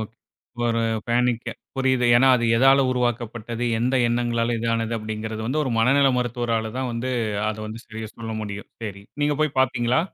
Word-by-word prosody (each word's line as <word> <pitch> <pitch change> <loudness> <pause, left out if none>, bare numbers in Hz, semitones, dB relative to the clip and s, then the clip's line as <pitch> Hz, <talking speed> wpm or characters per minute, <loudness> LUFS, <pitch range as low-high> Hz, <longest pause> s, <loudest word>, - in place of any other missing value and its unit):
Okay 110 +1 -7 0.5
ஒரு 115 0 +1 0.3
panic 120 0 +1 0.3
புரியுது. 130 -2 +2
ஏன்னா, 135 +2 +5
அது 120 - 0
எதால 135 +3 +6
உருவாக்கப்பட்டது, 120 -1 -2
எந்த 125 +3 +1
எண்ணங்களால் 120 0 0
இது 115 +1 -3
ஆனது, 115 0 -2
அப்படிங்கறது 110 0 -5
வந்து 150 +6 0
ஒரு 130 - -2
மனநிலை 135 +3 +4
மருத்துவரால 115 -2 -1
தான் 130 -1 -2
வந்து, 120 +3 -3 0.4
அதை 110 - -4
வந்து 110 +2 -8
சரியா 110 -1 -7
சொல்ல 115 -1 -6
முடியும். 100 -1 -6
சரி. 100 -3 -6 0.2
நீங்க 145 -1 +1
போய் 155 -3 0
பாத்தீங்களா? 125 +1 +2
120 Hz, 165 wpm, -23 LUFS, 110-125 Hz, 0.5 s, எதால